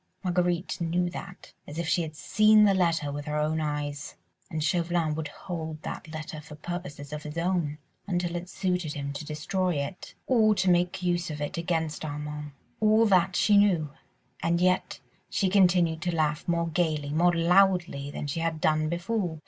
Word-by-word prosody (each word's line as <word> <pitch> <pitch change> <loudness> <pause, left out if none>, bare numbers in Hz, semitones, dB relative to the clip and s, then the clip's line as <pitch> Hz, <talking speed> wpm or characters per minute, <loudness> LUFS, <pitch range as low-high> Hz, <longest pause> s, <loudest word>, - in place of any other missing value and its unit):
Marguerite 180 -1 0
knew 175 +1 0
that 185 0 -9
as 145 - -8
if 170 -1 -2
she 175 - +2
had 155 -2 -5
seen 215 +6 +5
the 200 -1 +5
letter 165 -5 +1
with 145 0 -5
her 150 0 -2
own 155 +1 0
eyes; 145 -1 -3 0.3
and 160 -4 -2
Chauvelin 170 0 +1
would 155 0 -3
hold 160 0 -6
that - - -6
letter 155 -1 -7
for 150 0 -11
purposes 155 -3 -6
of 150 - -4
his 150 +2 -7
own, 170 -4 0 0.3
until 175 -2 -1
it 175 +1 -5
suited 180 -6 -1
him 140 -1 -4
to 140 - -5
destroy 160 +4 -1
it 140 +6 -5
or 220 -4 +4
to 190 -2 +3
make 175 +1 +1
use 175 -1 0
of 150 -1 -5
it 145 +5 -3
against 165 -2 -2
Armand. 150 0 -5 0.3
All 220 +1 +5
that 190 -3 +3
she 205 -1 +4
knew, 175 -8 +2 0.5
and 170 +1 +1
yet 185 +1 +1 0.3
she 195 - +1
continued 175 -4 +3
to 175 -2 -1
laugh 150 -1 0
more 170 -1 +1
gaily, 155 -3 0
more 175 +3 +3
loudly 175 -4 +3
than 145 - -5
she 145 +3 -3
had 165 -1 -1
done 155 0 +2
before. 175 0 -2
170 Hz, 180 wpm, -27 LUFS, 150-180 Hz, 0.5 s, seen